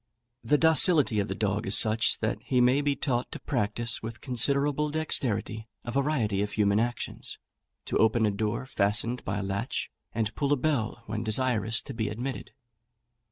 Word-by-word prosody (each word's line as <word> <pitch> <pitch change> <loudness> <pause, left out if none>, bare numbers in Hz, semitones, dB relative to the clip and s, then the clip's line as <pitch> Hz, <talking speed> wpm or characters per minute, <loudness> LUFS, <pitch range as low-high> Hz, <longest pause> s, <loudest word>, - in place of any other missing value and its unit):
The 150 - +3
docility 160 - +4
of 100 - 0
the - - -4
dog 105 0 -1
is 95 - +3
such, 110 0 +3
that - - -1
he 125 - +1
may 125 +3 +4
be 145 -1 0
taught 125 -3 -2
to - - -6
practise 115 -2 -2
with 115 0 -7
considerable 140 +4 +2
dexterity 115 -8 -2 0.2
a 120 - -4
variety 130 -7 0
of 105 0 -3
human 100 -1 +2
actions: 120 +1 -3 0.5
to - - -1
open 110 0 +3
a 105 - +2
door 105 +4 -2
fastened 115 0 0
by 95 +1 -3
a 100 - -3
latch, 95 +1 -3 0.2
and 110 -1 -2
pull 140 -1 -1
a - - +1
bell 120 -5 -1
when 110 +1 -4
desirous 115 -1 +2
to 135 - -8
be 110 -2 -2
admitted. 125 +5 -5
115 Hz, 175 wpm, -28 LUFS, 105-135 Hz, 0.5 s, docility